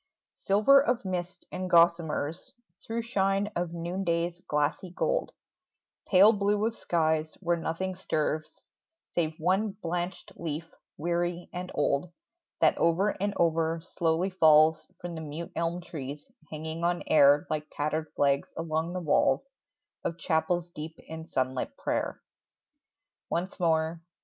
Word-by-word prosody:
Silver 215 +8 +5
of 245 -5 0
mist 180 -1 -4
and 185 0 -4
gossamers, 170 -1 +2 0.3
Through 230 +1 -3
shine 195 -2 +1
of 175 -1 -1
noonday's 170 0 -2
glassy 150 +5 0
gold, - - -1 0.8
Pale 200 +3 +7
blue 205 +1 +1
of 230 0 -1
skies, 160 -4 0
where 175 -2 +1
nothing 170 +3 -3
stirs 155 -4 -3 0.5
Save 160 -2 0
one 190 +5 +1
blanched 175 -2 -4
leaf, 160 0 -5 0.2
weary 175 +2 -1
and 180 0 -5
old, 145 +3 +1 0.5
That - - +4
over 170 +5 +3
and 205 0 0
over 165 0 +2
slowly 170 +1 0
falls 155 -2 +5
From 175 -1 -6
the 160 - -5
mute 160 +2 -6
elm 170 +1 -1
trees, 145 -3 -7 0.2
hanging 160 +2 -5
on 175 0 +1
air 145 -1 +5
Like 155 0 -2
tattered 155 +1 -2
flags 140 0 +2
along 165 +1 -2
the 185 - -3
walls 145 -4 +3 0.6
Of 165 - -2
chapels 175 +1 0
deep 160 0 -7
in 160 0 -9
sunlit 130 - -2
prayer. - - -2 1.1
Once 185 +4 -2
more 160 -1 +1
170 Hz, 130 wpm, -29 LUFS, 160-185 Hz, 1.1 s, Pale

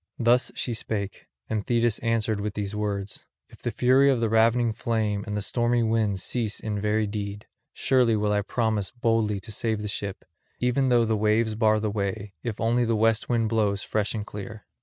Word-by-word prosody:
Thus 120 +2 +3
she 120 - -2
spake, 100 -3 -4 0.2
and 110 -2 -2
Thetis 120 -2 +1
answered 115 -2 0
with 105 0 -3
these 105 -1 -3
words: 105 -1 -3 0.2
"If - - -17
the - - -1
fury 130 +4 +4
of 130 -3 +2
the 115 -1 +1
ravening 115 +1 +3
flame 110 -3 -1
and 105 0 -2
the 105 - -2
stormy 120 +1 +1
winds 110 -4 +1
cease 115 -4 -2
in 105 -2 -3
very 105 +1 +1
deed, 100 0 -5 0.3
surely 125 -4 +2
will 105 0 +1
I 105 0 +2
promise 110 -2 -1
boldly 115 -4 0
to 110 - -9
save 110 0 -1
the - - -3
ship, 100 -1 -5 0.3
even 125 +2 +1
though 120 -2 +4
the 110 0 +1
waves 110 +1 +2
bar 110 -1 +3
the 105 -1 -1
way, 100 0 -3
if 115 -3 -4
only 120 +2 +2
the 115 -1 +1
west 110 +1 +2
wind 115 -2 +1
blows 105 -2 +1
fresh 110 +1 -1
and 105 -1 -3
clear. 105 +1 -8
110 Hz, 200 wpm, -26 LUFS, 105-115 Hz, 0.3 s, fury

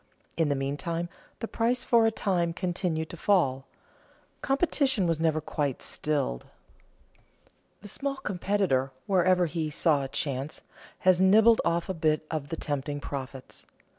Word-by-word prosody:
In 165 -3 +1
the 145 - +1
meantime 165 +5 -3 0.3
the 225 - -2
price 235 +3 0
for 230 -2 +4
a - - +2
time 175 -6 0
continued 175 -3 -2
to 170 - -8
fall. 140 -9 +2 0.7
Competition 270 - +1
was 165 -2 +1
never 160 -1 +2
quite 145 -3 -2
stilled. 140 - -2 1.3
The 205 - -10
small 275 +7 -2
competitor, 190 - 0
wherever 185 -1 +3
he 160 -1 -2
saw 150 -2 +2
a - - -3
chance, 140 +1 -3 0.4
has 185 -1 +4
nibbled 220 +4 +6
off 170 0 0
a 190 - -2
bit 155 -2 +1
of 150 -3 -3
the 165 - -4
tempting 145 0 -3
profits. 135 -2 -7
165 Hz, 140 wpm, -28 LUFS, 145-195 Hz, 1.3 s, nibbled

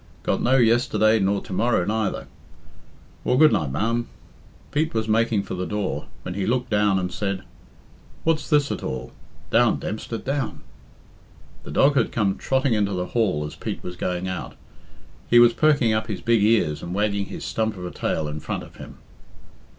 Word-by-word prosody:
Got - - 0
no 130 +2 +3
yesterday 115 -2 +3
nor 100 0 +1
to - - -8
morrow 110 -2 +2
neither. 110 -1 -1 1.0
Well, 125 - +2
good 155 +2 +7
night, 75 - 0
ma'am." 115 - -1 0.6
Pete 155 0 0
was 110 0 0
making 110 -2 +2
for - - -6
the 90 0 -3
door, 105 -2 -3 0.2
when 90 - -5
he 100 0 -2
looked 125 +1 0
down 105 -2 +3
and 90 -1 -2
said, 100 -2 -2 0.8
"What's 160 -1 0
this, 145 -3 +3
at - - -3
all? 65 - -5 0.4
Down, 120 0 +4
Dempster, 110 +2 -4
down!" 135 0 -3 1.0
The - - -11
dog 140 +1 +3
had 120 - +2
came 100 -4 +1
trotting 130 -1 +1
into 100 -2 +1
the 90 -1 -2
hall 95 -11 +1
as 75 - -7
Pete - - -6
was 90 - -6
going 90 +1 -2
out. 90 -1 -5 0.7
He 120 - +6
was 120 0 +7
perking 140 -2 +3
up 110 0 -1
his 105 -4 -4
big 115 -2 +3
ears 105 -9 +2
and 85 +2 -5
wagging 100 -1 0
his - - -7
stump 110 -2 -1
of 90 - -6
a 90 - -5
tail 75 - -2
in 75 +1 -5
front - - -4
of - - -14
him. - - -11
110 Hz, 185 wpm, -23 LUFS, 95-120 Hz, 1.0 s, good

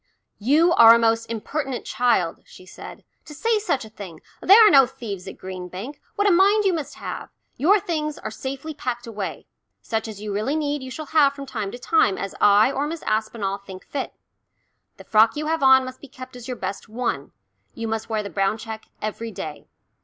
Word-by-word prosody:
"You 305 +10 +4
are 230 -6 +9
a - - +4
most 230 0 +1
impertinent 265 +4 -4
child," 215 -8 +1
she 185 - -16
said, 180 - -11 0.2
"to 300 - -11
say 450 +6 +1
such 280 - -1
a - - -12
thing. 190 -7 -10 0.2
There 425 +4 +8
are - - +5
no 270 -2 +7
thieves 210 -8 -7
at 190 - -8
Green 185 -1 -7
Bank 200 +11 -8
what 410 0 +2
a - - +5
mind 400 +4 +4
you 380 - +3
must 315 -4 -4
have! - - -6 0.3
Your 390 +9 +4
things 305 -4 -3
are - - -6
safely 270 +7 -6
packed 245 -4 -4
away. 210 -4 -5 0.3
Such 220 -1 -3
as 215 -2 -8
you 210 -1 -5
really 220 +9 -1
need 295 -2 -1
you 260 - -7
shall 310 +4 -6
have 285 -3 +5
from 280 -1 -8
time 215 -7 -4
to - - -7
time 250 - +2
as 195 - -4
I 205 +5 +6
or 280 +2 -1
Miss 330 +1 -6
Aspinall 215 -2 -1
think 190 -2 -11
fit. 275 -2 -5 0.8
The - - -12
frock 220 +1 +4
you 300 +1 -3
have 320 0 -1
on 265 -1 +6
must 255 0 -9
be 285 - -11
kept 255 0 -11
as 245 -2 -10
your 250 -2 -4
best 195 +3 -5
one, 235 - -1
and - - -28 0.4
you 230 - -4
must 225 0 -3
wear 215 -1 -1
the 200 - -7
brown 195 +4 0
check 220 -1 -8 0.2
every 220 +2 -4
day. 155 -7 -7
240 Hz, 215 wpm, -23 LUFS, 215-295 Hz, 0.8 s, are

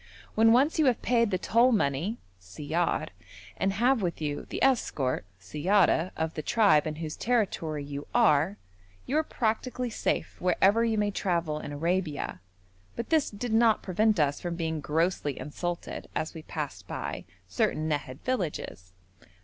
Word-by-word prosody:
When 225 +1 +5
once 275 +7 +3
you 305 - +4
have 245 -3 +1
paid 235 -2 +3
the 185 - 0
toll 235 +7 +3
money 185 - 0 0.2
(siyar), 150 - -2 0.5
and 195 - 0
have 240 +4 +2
with 175 -3 -2
you 145 -2 -3
the - - -3
escort 150 - +1
(siyara) 165 - +2
of 160 0 -1
the 155 - -4
tribe 200 -6 +3
in 155 - -3
whose 155 -1 -5
territory 185 -11 -1
you 140 0 -6
are, 195 -5 +3 0.5
you 275 - -2
are - - +1
practically 245 -1 -2
safe - - -2
wherever 195 +5 +3
you 225 -1 +1
may 210 -1 +1
travel 170 -6 -1
in 145 - -7
Arabia, 165 - -2 0.5
but 235 - -5
this 315 -3 +3
did 220 +2 -4
not 225 -1 +4
prevent 210 +2 +2
us 145 -1 +1
from 175 -1 -3
being 160 -2 -2
grossly 150 -1 0
insulted 175 +3 -5
as 155 - -2
we 160 - -8
passed 150 -2 -6
by - - -5 0.2
certain 150 - 0
Nahad 145 -3 -3
villages. 160 - -3
175 Hz, 155 wpm, -28 LUFS, 150-225 Hz, 0.5 s, When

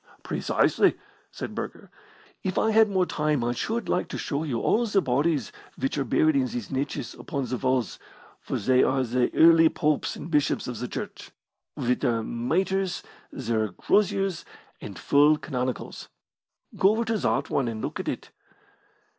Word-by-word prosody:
"Precisely," - - +2 0.3
said - - -7
Burger. - - -7 0.5
"If 185 -1 -3
I 220 - +2
had 220 0 +5
more 190 -2 +2
time 150 -6 0
I 120 - 0
should 220 - -2
like 180 - 0
to - - -5
show 145 -1 -2
you 130 -7 -2
all 235 - +2
the 205 -2 +3
bodies 140 - 0 0.3
which 135 +1 -1
are 140 - 0
buried 155 +2 +2
in 130 -2 +2
these 120 -4 -6
niches 135 -3 -3
upon 140 -5 -4
the 125 0 -3
walls, 130 -4 -1 0.4
for - - -4
they 130 +5 +3
are 130 0 +2
the 125 0 0
early 165 0 +7
popes 150 -2 0
and 165 - -8
bishops 150 -2 +1
of 125 -3 -5
the 125 - -3
Church, - - -7 0.5
with 125 +1 0
their 115 -2 0
mitres, 180 +11 -1 0.3
their 115 -4 -1
croziers, 195 - +1 0.4
and - - -8
full 145 +2 +4
canonicals. 130 -4 -4 0.7
Go 190 - +4
over 230 +1 -1
to 225 -1 0
that - - 0
one 135 -3 +1
and 110 -2 -4
look - - -4
at - - -5
it!" - - -4
140 Hz, 170 wpm, -26 LUFS, 125-180 Hz, 0.7 s, early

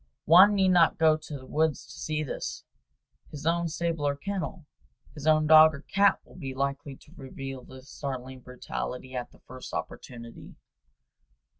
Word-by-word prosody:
One 190 +6 +7
need 190 -1 +3
not 175 -3 +4
go 160 -1 +4
to 155 -1 -8
the 130 - -13
woods 155 0 0
to - - -15
see 155 -1 -3
this; 140 - -5 0.7
his 150 -1 -9
own 170 +1 +1
stable 165 -2 -2
or 140 - 0
kennel, 190 +1 -5 0.5
his 150 0 -7
own 155 0 +4
dog 155 0 +7
or 140 - -10
cat 200 0 +3
will - - -17
be 135 -6 -6
likely 140 +1 -3
to 150 - -20
reveal 135 -1 -8
the 130 +1 -13
startling 130 -1 -7
brutality 125 +1 -6
at 125 -1 -4
the - - -22
first 130 0 -10
good - - -2
opportunity. 115 -1 -9
150 Hz, 170 wpm, -27 LUFS, 130-165 Hz, 0.7 s, One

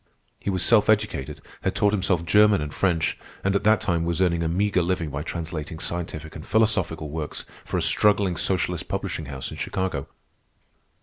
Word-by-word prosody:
He - - -3
was 95 -2 +1
self 110 -3 +5
educated, 105 -11 0 0.2
had - - -1
taught 105 0 +3
himself 90 -4 +1
German 105 +3 +5
and 75 0 -4
French, 85 -4 0 0.2
and 95 +1 +1
at 100 - +1
that 110 -2 +5
time 85 -3 0
was 85 +1 -1
earning 85 -2 +2
a 85 - 0
meagre 95 +2 +1
living 85 -3 -1
by 70 +1 -3
translating 80 -1 -5
scientific 80 -2 -5
and 75 - -7
philosophical 95 -9 +1
works 75 -1 -4 0.2
for - - -2
a - - +1
struggling 100 -3 +3
socialist - - 0
publishing 80 - -3
house 65 -2 -5
in - - -8
Chicago. 95 -8 -2
85 Hz, 180 wpm, -25 LUFS, 80-100 Hz, 0.2 s, self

